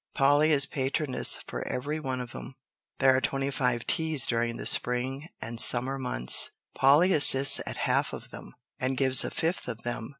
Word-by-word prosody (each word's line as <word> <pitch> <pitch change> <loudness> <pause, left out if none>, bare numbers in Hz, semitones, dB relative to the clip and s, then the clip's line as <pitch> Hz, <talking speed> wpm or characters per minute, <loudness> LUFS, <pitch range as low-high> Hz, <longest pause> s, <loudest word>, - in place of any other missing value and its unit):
Polly 145 +3 +2
is 140 -2 +6
patroness 135 0 0
for - - -8
every 145 +5 -5
one 130 -4 -5
of 125 0 -11
'em. 130 - -10 0.4
There 130 -1 +2
are 130 - -1
twenty 135 +1 -4
five 125 -3 -3
teas 160 -4 +1
during 115 0 -3
the - - -9
spring 130 +5 -2
and 115 0 +1
summer 130 +3 +4
months. 60 - +2 0.2
Polly 150 +8 +2
assists 140 -2 +5
at - - -7
half - - -1
of - - -11
them, - - -13 0.2
and 130 0 -3
gives 130 -1 +3
a - - -5
fifth 165 +3 -4
of 120 -2 -8
them. 120 -2 -6
130 Hz, 180 wpm, -26 LUFS, 125-140 Hz, 0.4 s, is